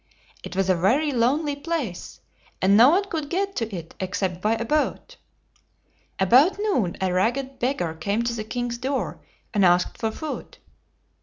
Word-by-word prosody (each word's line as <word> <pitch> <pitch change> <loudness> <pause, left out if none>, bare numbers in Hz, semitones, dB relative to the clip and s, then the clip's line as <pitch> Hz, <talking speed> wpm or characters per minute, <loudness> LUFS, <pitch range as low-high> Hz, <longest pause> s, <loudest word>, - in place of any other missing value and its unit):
It - - -7
was 195 0 +1
a 190 - +4
very 240 - +2
lonely 280 +5 +1
place, 285 - -4 0.4
and 195 +2 +4
no 235 +5 +8
one 370 +6 +3
could 315 -6 -4
get 390 +2 -1
to 225 -2 -2
it 165 -2 -8
except 185 -1 -2
by 215 +3 +2
a 230 0 -2
boat. 305 - -1 1.0
About 255 - +5
noon 380 - 0
a 185 -1 0
ragged 260 +8 0
beggar 240 - -1
came 200 +8 -1
to 235 0 -1
the 220 -2 -4
king's 240 +1 -4
door, 265 +2 -2 0.3
and 205 -3 +2
asked 180 0 +3
for 225 - 0
food. 305 +7 -7
235 Hz, 165 wpm, -24 LUFS, 190-290 Hz, 1.0 s, no